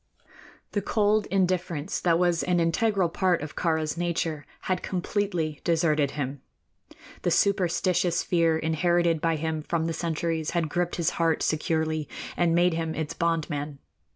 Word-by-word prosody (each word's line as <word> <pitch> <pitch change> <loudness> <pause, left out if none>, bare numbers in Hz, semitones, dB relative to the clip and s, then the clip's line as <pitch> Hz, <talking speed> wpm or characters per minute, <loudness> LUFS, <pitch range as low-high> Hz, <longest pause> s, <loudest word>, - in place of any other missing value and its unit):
The 205 - -1
cold 210 +1 +2
indifference 180 -4 0
that 170 -2 +3
was 175 -1 +2
an 180 -1 +1
integral 190 +3 +2
part 175 -1 +1
of 150 - -7
Kāra's 160 -2 0
nature 165 -3 -2
had 185 -1 -1
completely 180 -5 -2
deserted 155 -4 +2
him. 135 -1 -3 0.8
The - - +1
superstitious 180 -2 +2
fear 165 -2 +2
inherited 165 +1 +1
by 165 -1 +2
him 160 0 -2
from 160 +1 -1
the 165 - -1
centuries 165 -1 -2
had 165 -2 0
gripped 175 +2 -1
his 170 -2 0
heart 165 -1 +2
securely 155 -1 0 0.3
and 170 -1 +2
made 175 0 +4
him 160 -1 -2
its 155 -2 -3
bond 165 -2 0
man. 145 -1 -4
165 Hz, 150 wpm, -26 LUFS, 160-180 Hz, 0.8 s, made